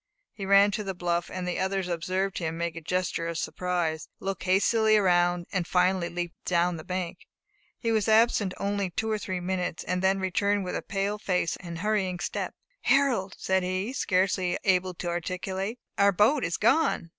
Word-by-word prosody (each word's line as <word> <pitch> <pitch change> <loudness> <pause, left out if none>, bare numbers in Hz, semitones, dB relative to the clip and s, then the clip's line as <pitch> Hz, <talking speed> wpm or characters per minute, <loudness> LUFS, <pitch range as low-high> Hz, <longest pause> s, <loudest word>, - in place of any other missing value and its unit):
He 195 -2 -6
ran 200 +1 +6
to 210 +1 -2
the 195 -2 -4
bluff, 175 0 -1
and 180 -1 -4
the 180 - -2
others 190 -1 -1
observed 185 +3 -1
him 165 -1 -3
make 170 -1 -2
a 165 - -6
gesture 180 0 -1
of 170 -1 -3
surprise, 175 -3 -2
look 195 -1 -4
hastily 215 +4 +3
around, 175 -3 +3
and 180 -3 -1
finally 180 -1 +2
leap 175 -1 -4
down 175 0 +1
the 155 - -8
bank. 180 -1 -4 0.5
He 230 - -1
was 220 -1 +1
absent 220 -3 +3
only 200 -1 -1
two 220 +5 -2
or 215 - 0
three 185 -2 -3
minutes, 180 -2 -2
and 180 0 -1
then 190 +1 +2
returned 200 +2 +1
with 180 - -3
a - - -2
pale 205 +1 -2
face 180 -5 0
and 170 -2 -7
hurrying 195 -2 0
step. - - -3 0.3
"Harold!" 265 -9 +2
said 190 0 +1
he, 185 +6 -2
scarcely 185 -5 +1
able 185 -2 +2
to 175 - -5
articulate, 185 +5 -3 0.2
"OUR 200 0 +5
BOAT 225 +8 +3
IS 165 - -1
GONE! 235 - +2
185 Hz, 185 wpm, -27 LUFS, 175-200 Hz, 0.5 s, ran